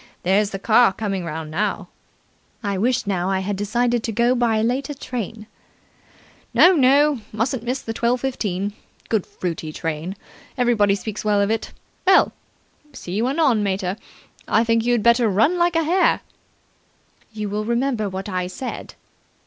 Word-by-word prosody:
There's 200 +3 +2
the 195 - -5
car 220 +1 +4
coming 195 -3 -3
round 160 -1 -5
now." 200 +1 -2 0.8
"I 200 -2 -1
wish 240 +5 0
now 190 -2 -1
I 190 -1 0
had 200 +1 -2
decided 235 +4 0
to 225 - -3
go 235 +3 +2
by 240 -3 +1
a 215 - +1
later 265 +5 -1
train." 230 -5 -6 1.1
"No, 365 - +7
no, 280 -2 +4
mustn't 225 +3 -1
miss 250 +3 -3
the 225 - -4
twelve 240 +2 0
fifteen. 205 -7 -2 0.4
Good, 220 -5 0
fruity 165 -3 -5
train. 160 +4 -4 0.4
Everybody 225 -5 +3
speaks 215 +1 -6
well 210 -1 +2
of 200 +1 +1
it. 225 - -2 0.4
Well, 380 - +6 0.6
see 175 - -8
you 220 +6 0
anon, 270 -6 +2
mater. 190 -2 -1 0.5
I 220 - +3
think 230 -1 +2
you'd 240 -2 +1
better 235 -1 +4
run 225 - +2
like 345 0 +2
a 330 - +3
hare." 355 +4 +2 1.1
"You 215 -1 -4
will 210 +1 -2
remember 235 -2 0
what 190 +1 -5
I 185 -2 -2
said?" 245 +8 -7
220 Hz, 160 wpm, -22 LUFS, 195-245 Hz, 1.1 s, No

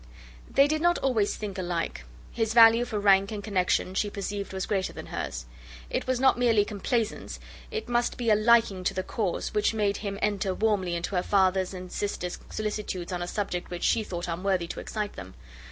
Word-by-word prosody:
They 275 +1 +5
did 310 +1 0
not 345 +1 +3
always 225 -7 +1
think 205 -3 -5
alike. 170 - -3 0.3
His 225 -1 -1
value 230 +1 +7
for 215 -3 -3
rank 195 0 +4
and 210 -2 -5
connexion 185 -2 0
she 205 +2 0
perceived 200 0 -4
was 190 0 -3
greater 195 -3 -1
than - - -8
hers. - - -5 0.5
It - - -2
was 255 -1 +1
not 265 -1 +4
merely 225 -4 +4
complaisance, 220 +2 -2 0.3
it 445 - -4
must 240 0 0
be 235 -3 +1
a - - +6
liking 215 -3 +3
to - - 0
the 185 - -1
cause, 195 -3 -2
which 210 +1 +1
made 205 -2 +1
him 200 -2 -4
enter 200 -2 0
warmly 195 -5 +1
into 170 +3 -3
her - - +3
father 190 -1 +3
and 185 -1 -8
sister's 180 -3 -3
solicitudes 210 -4 -4
on 180 -1 -3
a 175 - -3
subject 180 -2 -3
which 175 -1 -5
she 220 - +2
thought 175 -4 -5
unworthy 180 +1 0
to - - -5
excite 210 -2 -4
them. 95 0 -10
205 Hz, 200 wpm, -27 LUFS, 185-225 Hz, 0.5 s, value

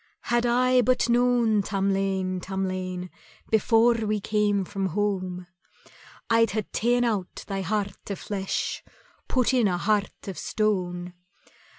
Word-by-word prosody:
"Had 240 0 +1
I 250 +1 +4
but 250 +1 +2
known, 240 -3 +3
Tamlane, 195 -1 -1
Tamlane, 185 -1 -3 0.4
Before 225 +2 +4
we 215 -2 -1
came 205 -1 +1
from 195 0 -2
home, 185 -1 -2 0.8
I'd 230 0 +4
hae 215 -1 -1
ta'en 245 +2 +2
out 210 -6 -2
thy 195 -1 -3
heart 200 0 -3
o' 200 - -2
flesh, 195 0 -3 0.4
Put 255 0 +1
in 245 -4 +4
a 180 -2 0
heart 205 +3 -1
of 195 - -5
stone. 180 -4 -1
205 Hz, 125 wpm, -26 LUFS, 190-230 Hz, 0.8 s, I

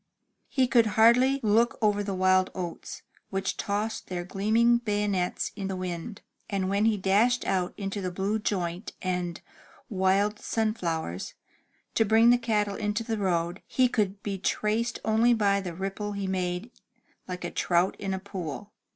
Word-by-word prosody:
He 260 -2 +2
could 235 -2 +4
hardly 250 +5 +5
look 225 +3 +3
over 210 -2 +2
the 200 -1 -3
wild 185 0 +3
oats, 175 -3 -6 0.3
which 195 0 -2
tossed 210 +2 -2
their 175 -1 -3
gleaming 220 +6 +3
bayonets 205 -5 -1
in 200 -2 -4
the 190 - -3
wind, 185 +3 -5 0.3
and 195 -2 -1
when 200 +2 +2
he 220 -2 +3
dashed 210 +6 +2
out 180 -2 0
into 200 0 -3
the 185 - -2
blue 195 +4 -1
joint 180 -2 -3
and 180 -2 -2 0.5
wild 200 +1 +1
sunflowers, 170 - -2 0.6
to 225 - +3
bring 225 +2 +5
the 245 - +4
cattle 210 -3 0
into 210 +1 -1
the 225 -1 -2
road, 175 -1 -1
he 255 -1 +3
could 205 -4 -1
be 200 -2 -3
traced 220 +5 0
only 225 +2 +4
by 200 -2 +2
the 180 -3 -6
ripple 195 +3 -4
he 200 -1 -3
made, 185 +3 -2 0.6
like 180 -1 -5
a - - -3
trout 175 +1 +1
in 195 -1 -3
a 190 - -1
pool. 190 0 -6
200 Hz, 160 wpm, -27 LUFS, 185-220 Hz, 0.6 s, hardly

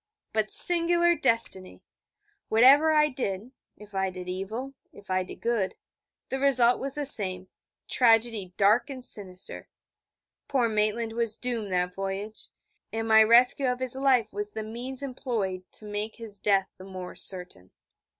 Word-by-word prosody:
But 215 -1 -1
singular 345 0 +5
destiny! 230 - +2 0.7
Whatever 270 +8 +5
I 300 -1 +3
did 235 -4 -5 0.3
if 210 -1 -16
I 190 0 -1
did 180 -1 -10
evil, 215 +9 -6 0.2
if 200 -1 -13
I 185 0 0
did 185 - -10
good 225 -6 -2 0.5
the 265 - -4
result 255 -3 +3
was 275 0 -5
the 295 -1 -3
same: 185 -8 +5 0.4
tragedy 225 -5 +1
dark 210 +8 +2
and 260 -2 -7
sinister! 185 -5 -7 0.8
Poor 255 -4 0
Maitland 220 +1 -2
was 230 -2 +1
doomed 230 -5 -4
that 180 0 -1
voyage, 195 +3 -7 0.4
and 225 0 -4
my 220 0 +6
rescue 250 +4 +4
of 250 - -5
his 255 -1 -3
life 265 -3 +1
was 205 0 -5
the 220 - -5
means 245 +5 -3
employed 220 -9 -5
to 215 - -7
make 210 +1 -6
his 220 -4 -7
death 195 -1 0
the - - -11
more 185 -1 -9
certain. 180 - -3
220 Hz, 150 wpm, -26 LUFS, 195-255 Hz, 0.8 s, my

